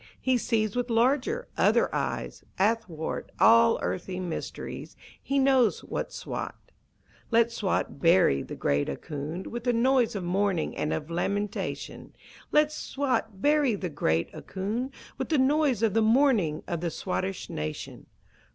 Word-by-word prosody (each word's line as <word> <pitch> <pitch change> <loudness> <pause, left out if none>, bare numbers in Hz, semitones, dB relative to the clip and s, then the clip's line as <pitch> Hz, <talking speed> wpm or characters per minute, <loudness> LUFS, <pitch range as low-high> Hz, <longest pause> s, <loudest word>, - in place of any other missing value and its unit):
He 260 -1 +2
sees 220 -3 0
with 245 0 -1
larger, 265 - +1
other - - +3
eyes, - - -3
Athwart 195 -6 -1
all 230 0 +6
earthly 185 0 -3
mysteries 180 -3 -6 0.3
He 275 - -1
knows 265 -4 +3
what's - - -4
Swat. - - -5 0.7
Let 230 0 +3
Swat 205 -9 -1
bury 165 - +4
the - - -7
great 70 0 0
Ahkoond 150 - -5
With 240 +1 -6
a 245 - +4
noise 245 -1 +3
of 195 - -3
mourning 185 -1 0
and 150 - -1
of 155 +1 -3
lamentation! 200 +4 -3 0.4
Let 300 0 +4
Swat 255 -9 -2
bury 290 -5 +3
the 185 -3 -4
great 85 - 0
Ahkoond 220 +8 -4 0.3
With - - -3
the 315 - +3
noise 270 -3 +2
of 220 -4 +3
the 225 - +3
mourning 220 - +3
of 170 -2 -3
the 175 - -1
Swattish 185 +2 -3
nation! 75 0 -5
220 Hz, 140 wpm, -27 LUFS, 175-255 Hz, 0.7 s, all